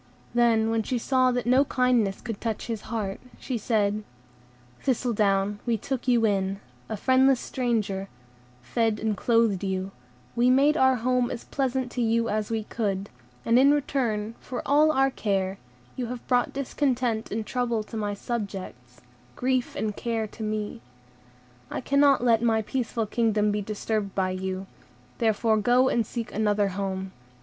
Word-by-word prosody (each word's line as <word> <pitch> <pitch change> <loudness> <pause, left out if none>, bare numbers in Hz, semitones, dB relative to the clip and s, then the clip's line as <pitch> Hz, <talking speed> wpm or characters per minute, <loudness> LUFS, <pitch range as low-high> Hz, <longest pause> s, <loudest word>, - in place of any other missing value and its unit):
Then, 230 -2 +3
when 225 0 +1
she 245 +3 -2
saw 255 +1 +2
that 245 -1 -1
no 255 +3 +5
kindness 250 -7 +1
could 225 -4 -6
touch 225 -2 -3
his 225 -2 -5
heart, 210 -4 -3 0.2
she 255 - -4
said:— 215 -2 0 0.8
"Thistledown, 210 -5 +1
we 230 -1 +2
took 260 +4 -4
you 240 -2 +4
in, 195 -2 0 0.3
a 220 - -3
friendless 260 +3 +4
stranger, 210 -6 -2 0.5
fed 220 - 0
and 220 -1 0
clothed 230 -3 +2
you, 190 0 -2 0.4
and 250 +2 +4
made 290 +3 +4
our 260 -3 +4
home 250 +1 +1
as 240 - -5
pleasant 260 -2 -2
to 245 - -2
you 230 0 +1
as 215 0 -1
we 225 -1 -1
could; 200 -3 -3 0.3
and 230 +2 +5
in 275 +2 +6
return 230 -7 -1
for 250 - -6
all 300 +2 +5
our 270 -2 +3
care, 195 -4 -1 0.4
you 250 -2 -3
have 245 0 -7
brought 245 -1 +2
discontent 255 -4 -1
and 215 +1 -3
trouble 240 -2 -1
to 225 - -10
my 205 -2 -2
subjects, 190 - -6 0.3
grief 255 -1 0
and 210 -2 -2
care 230 -2 -2
to 215 - -11
me. 215 - -3 0.9
I - - -3
cannot 280 0 +3
let 230 -2 +4
my 225 -2 +2
peaceful 230 -1 -2
kingdom 215 -1 +1
be 205 0 -1
disturbed 210 0 -3
by 185 -1 +1
you; 190 0 -4 0.5
therefore 220 0 +2
go 245 +4 +4
and 230 -3 +1
seek 235 -2 -5
another 210 -1 +1
home. 190 0 -3
225 Hz, 160 wpm, -26 LUFS, 205-250 Hz, 0.9 s, in